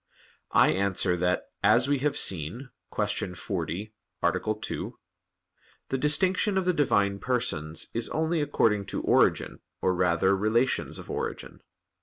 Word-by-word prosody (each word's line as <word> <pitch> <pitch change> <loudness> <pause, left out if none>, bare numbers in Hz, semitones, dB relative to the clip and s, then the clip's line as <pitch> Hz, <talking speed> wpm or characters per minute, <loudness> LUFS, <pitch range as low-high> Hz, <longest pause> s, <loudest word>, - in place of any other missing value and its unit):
I - - +6
answer 95 -1 +1
that, 90 +1 0 0.2
as 120 +4 +4
we 140 -1 +1
have 145 +2 0
seen 95 - 0 0.2
(Q. 90 - -2
40, 95 +3 -4 0.3
A. 110 - +1
2), - - -5 0.9
the 135 - 0
distinction 185 +7 +2
of 190 - 0
the 180 - +2
Divine 100 -10 +1
Persons 85 -11 -1
is 115 0 -2
only 160 +1 0
according 105 -8 +1
to - - -3
origin, - - +2 0.2
or, 95 - +1
rather, 90 +2 +2
relations 110 +6 0
of - - -9
origin. - - -5
110 Hz, 135 wpm, -27 LUFS, 90-135 Hz, 0.9 s, I